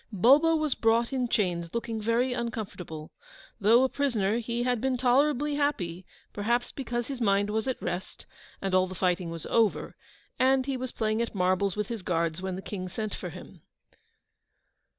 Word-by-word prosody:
Bulbo 275 Hz, -, +5 dB
was 310 Hz, -3 st, +1 dB
brought 230 Hz, +3 st, +2 dB
in 255 Hz, -2 st, 0 dB
chains, 175 Hz, -6 st, -1 dB
looking 230 Hz, -1 st, -2 dB
very 235 Hz, +4 st, +1 dB
uncomfortable. 210 Hz, -10 st, -5 dB, 0.5 s
Though 225 Hz, +5 st, +5 dB
a -, -, +4 dB
prisoner, 230 Hz, -7 st, 0 dB
he 235 Hz, +1 st, -2 dB
had 245 Hz, -2 st, 0 dB
been 265 Hz, -1 st, +1 dB
tolerably 280 Hz, +3 st, +2 dB
happy, 190 Hz, -, -1 dB, 0.3 s
perhaps 235 Hz, +4 st, 0 dB
because 240 Hz, -3 st, -3 dB
his 265 Hz, -1 st, -6 dB
mind 200 Hz, -1 st, +2 dB
was 220 Hz, +3 st, -1 dB
at 260 Hz, -, -1 dB
rest, 180 Hz, +1 st, -5 dB, 0.4 s
and 195 Hz, -1 st, -1 dB
all 185 Hz, 0 st, +4 dB
the 185 Hz, -, -8 dB
fighting 180 Hz, -1 st, 0 dB
was 165 Hz, -1 st, -6 dB
over, 225 Hz, -3 st, +1 dB, 0.4 s
and 260 Hz, 0 st, +4 dB
he 275 Hz, -1 st, -1 dB
was 255 Hz, 0 st, -4 dB
playing 220 Hz, +1 st, 0 dB
at 235 Hz, -, -3 dB
marbles 185 Hz, +1 st, +1 dB
with 210 Hz, -1 st, -2 dB
his 230 Hz, -3 st, -4 dB
guards 170 Hz, -1 st, -1 dB
when 190 Hz, -1 st, -3 dB
the 190 Hz, -, -7 dB
King 185 Hz, -3 st, -5 dB
sent 215 Hz, +3 st, -4 dB
for -, -, -5 dB
him. -, -, -12 dB
225 Hz, 175 wpm, -28 LUFS, 185-250 Hz, 0.5 s, Bulbo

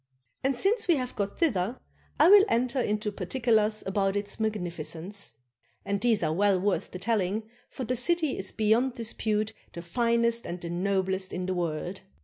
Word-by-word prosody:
And 270 Hz, 0 st, +1 dB
since 420 Hz, -, +2 dB
we 345 Hz, -, +5 dB
have 255 Hz, -2 st, -4 dB
got 200 Hz, -1 st, -3 dB
thither 235 Hz, -, +1 dB, 0.4 s
I 310 Hz, -, +7 dB
will 400 Hz, +1 st, +9 dB
enter 250 Hz, +2 st, +1 dB
into 210 Hz, -2 st, -1 dB
partic 255 Hz, +4 st, -5 dB
ulars 215 Hz, -2 st, +3 dB
about 195 Hz, 0 st, 0 dB
its 205 Hz, +1 st, -2 dB
magnificence; 180 Hz, -, -3 dB, 0.5 s
and 200 Hz, 0 st, -1 dB
these 230 Hz, -3 st, +2 dB
are 155 Hz, -, +1 dB
well 195 Hz, +1 st, +3 dB
worth 200 Hz, +1 st, 0 dB
the -, -, -7 dB
telling, 205 Hz, +1 st, 0 dB, 0.3 s
for 260 Hz, -, -6 dB
the 250 Hz, +1 st, -1 dB
city 315 Hz, +3 st, +2 dB
is 190 Hz, -, -3 dB
beyond 225 Hz, +4 st, +2 dB
dispute 215 Hz, -1 st, -1 dB, 0.2 s
the 170 Hz, -, -7 dB
finest 235 Hz, +5 st, +1 dB
and 175 Hz, -, -5 dB
the 170 Hz, -1 st, -5 dB
noblest 190 Hz, +1 st, -1 dB
in 180 Hz, 0 st, -3 dB
the 185 Hz, -, -1 dB
world. 175 Hz, +1 st, -3 dB
210 Hz, 175 wpm, -28 LUFS, 190-240 Hz, 0.5 s, will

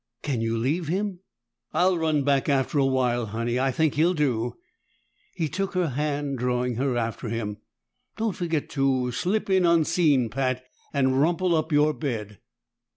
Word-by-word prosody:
"Can 135 Hz, -6 st, -1 dB
you 115 Hz, 0 st, 0 dB
leave 145 Hz, +8 st, -1 dB
him?" 190 Hz, +2 st, -2 dB, 0.5 s
"I'll 185 Hz, +1 st, +3 dB
run 160 Hz, -3 st, +1 dB
back 140 Hz, 0 st, +2 dB
after 140 Hz, +1 st, +1 dB
a 135 Hz, -, +4 dB
while, 125 Hz, -3 st, +1 dB
Honey. 115 Hz, +3 st, -2 dB
I 135 Hz, +1 st, +2 dB
think 155 Hz, +3 st, +1 dB
he'll 170 Hz, +5 st, +2 dB
do." 120 Hz, -6 st, 0 dB, 0.8 s
He 160 Hz, -, -1 dB
took 195 Hz, +5 st, -3 dB
her 180 Hz, -3 st, +1 dB
hand, 145 Hz, 0 st, -2 dB
drawing 125 Hz, -1 st, 0 dB
her 130 Hz, -1 st, 0 dB
after 115 Hz, 0 st, -3 dB
him. 105 Hz, -2 st, -3 dB, 0.6 s
"Don't 220 Hz, -3 st, -1 dB
forget 165 Hz, -4 st, -2 dB
to 130 Hz, -3 st, +1 dB
slip 185 Hz, -, -1 dB
in 190 Hz, -2 st, +3 dB
unseen, 165 Hz, -6 st, +3 dB
Pat, 130 Hz, 0 st, -1 dB, 0.3 s
and 130 Hz, -1 st, +2 dB
rumple 175 Hz, +3 st, +2 dB
up 160 Hz, +1 st, -1 dB
your 150 Hz, +1 st, +4 dB
bed." 110 Hz, -9 st, -4 dB
140 Hz, 160 wpm, -25 LUFS, 125-165 Hz, 0.8 s, a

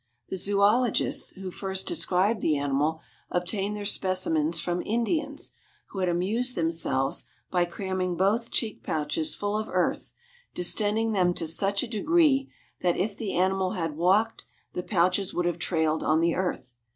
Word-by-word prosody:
The -, -, -3 dB
zoölogists, 205 Hz, +5 st, +2 dB
who 190 Hz, -1 st, -6 dB
first 190 Hz, +1 st, -3 dB
described 205 Hz, -, +1 dB
the 155 Hz, -2 st, +2 dB
animal, 145 Hz, +3 st, 0 dB, 0.3 s
obtained 195 Hz, +3 st, -1 dB
their 205 Hz, -1 st, -5 dB
specimens 170 Hz, -5 st, +1 dB
from 175 Hz, +1 st, -1 dB
Indians, 285 Hz, +6 st, -1 dB, 0.4 s
who 195 Hz, -, -6 dB
had 185 Hz, -1 st, +1 dB
amused 215 Hz, +9 st, 0 dB
themselves 160 Hz, -5 st, 0 dB, 0.3 s
by 180 Hz, -1 st, +2 dB
cramming 185 Hz, 0 st, -2 dB
both 215 Hz, +6 st, +1 dB
cheek 220 Hz, -3 st, -1 dB
pouches 155 Hz, 0 st, -1 dB
full 205 Hz, 0 st, -2 dB
of 215 Hz, 0 st, -2 dB
earth, 180 Hz, -1 st, 0 dB, 0.4 s
distending 210 Hz, +5 st, +2 dB
them 180 Hz, -4 st, +2 dB
to -, -, -2 dB
such 195 Hz, +6 st, +1 dB
a -, -, -4 dB
degree 275 Hz, +4 st, +2 dB, 0.3 s
that 175 Hz, -1 st, +1 dB
if 200 Hz, +2 st, -1 dB
the 210 Hz, -2 st, -4 dB
animal 190 Hz, 0 st, +1 dB
had 165 Hz, -6 st, -3 dB
walked 195 Hz, +7 st, +2 dB, 0.3 s
the -, -, -2 dB
pouches 185 Hz, +1 st, +1 dB
would 175 Hz, -, 0 dB
have 175 Hz, -1 st, -1 dB
trailed 160 Hz, -2 st, 0 dB
on 155 Hz, +1 st, +2 dB
the 170 Hz, 0 st, +2 dB
earth. 180 Hz, -9 st, -3 dB
185 Hz, 155 wpm, -27 LUFS, 170-210 Hz, 0.4 s, zoölogists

